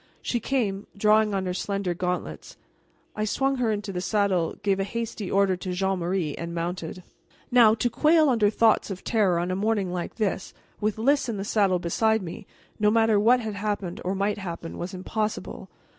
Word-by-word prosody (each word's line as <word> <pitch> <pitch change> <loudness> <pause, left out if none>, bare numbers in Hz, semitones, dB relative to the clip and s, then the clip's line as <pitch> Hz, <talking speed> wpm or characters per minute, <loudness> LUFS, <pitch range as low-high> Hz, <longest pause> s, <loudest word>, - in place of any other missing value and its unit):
She 240 - -1
came, 210 -6 -1
drawing 210 0 +3
on 190 -1 -1
her 180 - -2
slender 195 -1 -2
gauntlets. 180 +1 -4 0.6
I 215 - -1
swung 270 +5 0
her 240 -3 +1
into 205 -1 -3
the 180 - -3
saddle, 195 -4 +1
gave 195 -1 +1
a - - +1
hasty 220 -1 -4
order 195 -1 +3
to 180 0 -4
Jean 190 +1 0
Marie, 170 -3 -1
and 170 0 -5
mounted. 175 +1 -4 0.5
Now, 235 -3 +6
to 235 - 0
quail 310 +6 +4
under 225 -6 +3
thoughts 220 +1 +3
of 190 -2 -6
terror 205 -7 +2
on 175 +2 -1
a - - 0
morning 200 -2 0
like 175 -1 -4
this, 205 -4 -2 0.2
with 215 0 -1
Lys 275 +3 +2
in 220 - -2
the 195 - -3
saddle 200 -4 +2
beside 220 +5 +1
me, 170 -1 -8 0.3
no 210 0 +4
matter 225 -1 +3
what 245 +4 +4
had 220 -2 -4
happened 200 -3 -3
or 185 +2 -1
might 205 +2 -1
happen 170 -3 -6
was 180 +2 -5
impossible. 215 +3 -4
200 Hz, 190 wpm, -26 LUFS, 185-220 Hz, 0.6 s, Now